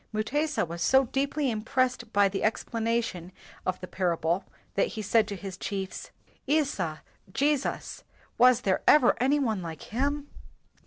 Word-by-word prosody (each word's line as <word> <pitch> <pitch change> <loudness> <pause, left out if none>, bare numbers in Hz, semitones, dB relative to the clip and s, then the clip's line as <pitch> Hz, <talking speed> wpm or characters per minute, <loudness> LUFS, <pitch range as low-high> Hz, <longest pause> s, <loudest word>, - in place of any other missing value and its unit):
Mutesa 290 - 0
was 170 +1 -7
so 265 +8 +4
deeply 275 +2 -1
im 215 -1 -3
pressed 250 -1 0
by 200 -1 +4
the 195 0 -3
explanation 225 -5 -1 0.4
of 185 - -1
the 180 - -6
parable 175 0 0 0.3
that - - +2
he 215 - -3
said 210 +1 +3
to 205 - -4
his 190 -1 -7
chiefs, 195 -1 -5 0.4
"Isa 265 - 0 0.3
[Jesus], 285 +4 -1 0.3
was 250 0 +5
there 190 -4 +1
ever 255 -5 +6
any 270 +3 +3
one 225 -9 0
like 165 -2 -7
him?" 285 +4 -1
225 Hz, 150 wpm, -28 LUFS, 190-270 Hz, 0.4 s, ever